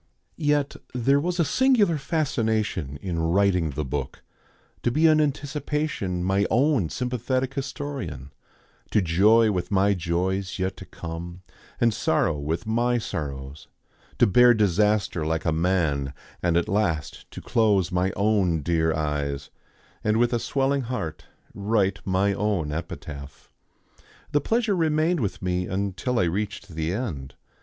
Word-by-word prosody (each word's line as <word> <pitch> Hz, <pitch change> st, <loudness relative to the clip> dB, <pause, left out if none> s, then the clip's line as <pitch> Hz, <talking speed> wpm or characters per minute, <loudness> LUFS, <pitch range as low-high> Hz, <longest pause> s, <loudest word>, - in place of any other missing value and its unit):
Yet 145 Hz, -2 st, 0 dB, 0.2 s
there 135 Hz, +3 st, +3 dB
was 175 Hz, +4 st, -2 dB
a 170 Hz, -, +4 dB
singular 215 Hz, -, +3 dB
fascination 110 Hz, -, -1 dB
in 85 Hz, -3 st, -2 dB
writing 90 Hz, 0 st, +2 dB
the 75 Hz, +1 st, -3 dB
book; 70 Hz, +3 st, -4 dB, 0.6 s
to -, -, +1 dB
be 155 Hz, +7 st, +2 dB
in 155 Hz, -1 st, +6 dB
anticipation 145 Hz, -, -2 dB
my 95 Hz, +2 st, +2 dB
own 130 Hz, -, +2 dB
sympathetic 125 Hz, +1 st, -2 dB
historian, 135 Hz, -, -5 dB, 0.6 s
to -, -, +3 dB
joy 105 Hz, +7 st, +4 dB
with 90 Hz, -3 st, -2 dB
my 100 Hz, 0 st, +3 dB
joys 90 Hz, +2 st, -1 dB
yet 95 Hz, 0 st, -2 dB
to -, -, -9 dB
come, 85 Hz, +2 st, -7 dB, 0.4 s
and 115 Hz, -2 st, +3 dB
sorrow 80 Hz, -5 st, +1 dB
with 80 Hz, +4 st, -3 dB
my 120 Hz, +2 st, +1 dB
sorrows, 70 Hz, -, -5 dB, 0.5 s
to -, -, +5 dB
bear 120 Hz, +4 st, +6 dB
disaster 105 Hz, -3 st, +2 dB
like 80 Hz, +1 st, -1 dB
a 80 Hz, -, +2 dB
man, 80 Hz, -5 st, 0 dB, 0.3 s
and 85 Hz, -1 st, +2 dB
at 85 Hz, -, +1 dB
last 85 Hz, -9 st, -1 dB
to -, -, -9 dB
close 100 Hz, -5 st, +2 dB
my 90 Hz, +1 st, +1 dB
own 100 Hz, -6 st, +2 dB
dear 80 Hz, -1 st, +1 dB
eyes, 75 Hz, -2 st, -2 dB, 0.5 s
and 110 Hz, 0 st, +2 dB
with 120 Hz, +1 st, +2 dB
a 120 Hz, -, +1 dB
swelling 135 Hz, +3 st, 0 dB
heart 115 Hz, -11 st, -4 dB, 0.3 s
write 100 Hz, -2 st, 0 dB
my 95 Hz, +1 st, +2 dB
own 100 Hz, -7 st, -1 dB
epitaph. 75 Hz, -3 st, -7 dB, 0.8 s
The 145 Hz, -, +2 dB
pleasure 225 Hz, -, +1 dB
remained 160 Hz, 0 st, +2 dB
with 100 Hz, -5 st, -3 dB
me 90 Hz, 0 st, -1 dB
until 100 Hz, +6 st, -2 dB
I 95 Hz, -, +3 dB
reached 100 Hz, +3 st, -2 dB
the 80 Hz, 0 st, -2 dB
end. 80 Hz, -, -4 dB
100 Hz, 140 wpm, -25 LUFS, 85-125 Hz, 0.8 s, in